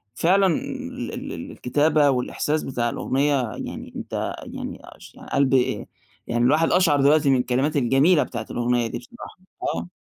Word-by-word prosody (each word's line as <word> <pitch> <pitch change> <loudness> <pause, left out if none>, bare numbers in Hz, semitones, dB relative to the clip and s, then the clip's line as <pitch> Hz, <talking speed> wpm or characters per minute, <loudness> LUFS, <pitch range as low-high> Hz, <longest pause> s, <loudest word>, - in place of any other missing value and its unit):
فعلًا 195 +6 +3
ال 165 - -4
ال - - -6
الكتابة 150 +2 +2
والإحساس 140 +4 -1
بتاع 120 -3 -1
الأغنية 140 +4 0 0.2
يعني - - -7
أنت - - -4
يعني - - -7
اش - - -14 0.2
قلبي 135 -2 +2 0.4
يعني 120 0 0
الواحد 155 +5 +3
قشعَر 165 -6 +4
دلوقتي 145 +1 +4
من 135 - +4
الكلمات 130 +4 0
الجميلة 140 +6 +4
بتاعة 115 -3 -6
الأغنية 120 0 0
دي 115 - -5
بصراحة، 180 - -12 0.3
آه. 85 +1 -2
135 Hz, 145 wpm, -23 LUFS, 125-155 Hz, 0.4 s, قشعَر